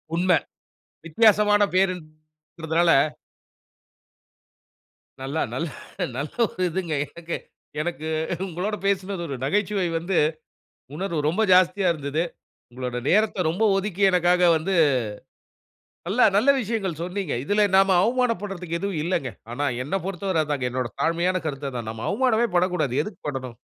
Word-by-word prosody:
உண்ம. 180 +2 +2 0.8
வித்தியாசமான 210 +3 +4
பேருன்குறதனால, 160 -2 -1 2.3
நல்லா 140 +4 -2
நல்லா 165 -3 -3 0.4
நல்ல 145 +2 -4 0.2
ஒரு 185 - -4
இதுங்க. 170 -1 -3 0.2
எனக்கு 170 0 -5 0.4
எனக்கு 160 -1 -4 0.4
உங்களோட 185 +4 -3
பேசினது, 195 -1 -1
ஒரு 140 - -4
நகைச்சுவை 195 +5 0
வந்து, 170 +2 -1 0.8
உணர்வு 175 -2 -3
ரொம்ப 200 +8 +1
ஜாஸ்தியா 185 +1 +4
இருந்தது. 150 +1 -2 0.5
உங்களோட 125 0 -4
நேரத்த 205 -3 +2
ரொம்ப 180 +7 -1
ஒதுக்கி 195 -1 -2
எனக்காக 180 0 +4
வந்து 175 +5 -2 1.4
நல்லா 225 +7 +3
நல்ல 240 +7 +5
விஷயங்கள் 195 -8 -3
சொன்னீங்க. 180 -2 -3
இதில 205 +7 +2
நாம 195 0 +5
அவமானப்படுறதுக்கு 200 -7 -1
எதுவும் 195 -5 -2
இல்லைங்க. 160 -7 -1 0.2
ஆனா, 140 +4 -2 0.2
என்னப் 175 +5 -3
பொருத்தவர 190 -3 -1
அதுதாங்க. 145 -4 -2
என்னோட 125 -1 -2
தாழ்மையான 175 +3 +1
கருத்து 140 -2 -3
அதான். 120 -4 -5
நம்ம 110 0 -7
அவமானமே 240 -3 +2
படக்கூடாது. 175 -7 +1
எதுக்கு 205 +4 -8
படணு? 130 -3 -4
180 Hz, 120 wpm, -24 LUFS, 155-195 Hz, 2.3 s, நல்ல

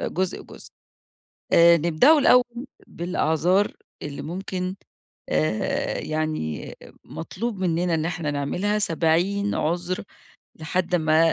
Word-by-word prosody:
جزء، 185 0 -2
جزء. - - -14 0.8
آآ، 170 0 +7
نبدأه 170 - +4
الأول 250 -2 +3 0.2
بالأعذار 175 +2 0 0.3
اللي 145 -1 -6
ممكن، 185 +2 -4 0.5
آآ، 80 +8 0
يعني 155 - -3 0.3
مطلوب 205 +5 -5
مننا 175 -1 0
إن 160 0 0
إحنا 165 -3 -2
نعملها 175 +9 -1
70 185 +3 +1
عذر 175 +4 -2 0.5
لحد 175 +3 -2
ما 160 0 +3
170 Hz, 100 wpm, -24 LUFS, 155-190 Hz, 0.8 s, آآ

